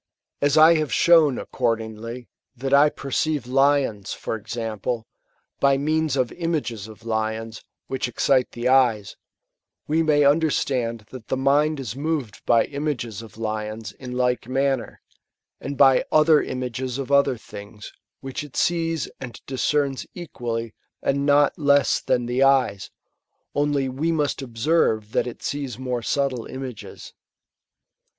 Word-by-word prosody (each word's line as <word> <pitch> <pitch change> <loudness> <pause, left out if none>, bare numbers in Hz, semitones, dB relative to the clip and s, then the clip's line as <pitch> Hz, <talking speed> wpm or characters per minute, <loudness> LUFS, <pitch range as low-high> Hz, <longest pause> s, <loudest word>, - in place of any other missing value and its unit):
As 145 +1 +2
I 160 +2 +7
have 155 -2 -2
shown, 160 -6 +5
accordingly, 115 0 -3 0.3
that 135 +2 -3
I 145 +2 +6
perceive 145 0 -2
Uont, 135 -5 +1
for - - -4
example,' 110 +1 -4 0.5
by 140 0 +4
means 155 0 0
of 125 -2 0
images 145 - -3
of 110 0 -14
lions, 110 0 -3 0.2
which 130 -2 -2
excite 125 +1 +1
the 120 +1 -2
eyes; 125 -6 +3 0.7
we 160 +2 +2
may 150 -2 +3
nn> 145 +3 +4
derstand 120 -7 -1
that 125 -4 -10
the - - -1
mind 145 +3 +2
is 125 -4 -5
moved 145 -6 -3
by 115 - +4
images 140 -7 -4
of 115 -1 -13
lions 110 -1 -4
in 125 +1 -9
like 125 -1 0
manner, 135 -1 -1 0.6
and 140 0 -6
by 135 -2 +6
other 155 0 +5
images 125 0 -4
of 135 -1 -5
oAer 140 -3 +3
things,* 105 0 -11 0.3
which 135 +1 -5
it 145 -4 -12
sees 165 -2 0
mid 125 -3 -8
diteerTU 135 +1 -1
equally 115 - -5 0.3
and 140 +1 0
not 145 +1 +3
less 145 -1 +3
than 120 -1 0
the 125 +2 -1
eyes; 130 -8 +2 0.6
only 145 -2 +1
we 140 +6 -1
must 150 -3 -1
observe 115 -3 0
that - - 0
it 120 - -6
Bees 140 -5 -5
more 125 -2 -3
subtle 130 -2 -1
images. 130 -4 -8
130 Hz, 140 wpm, -23 LUFS, 115-145 Hz, 0.7 s, I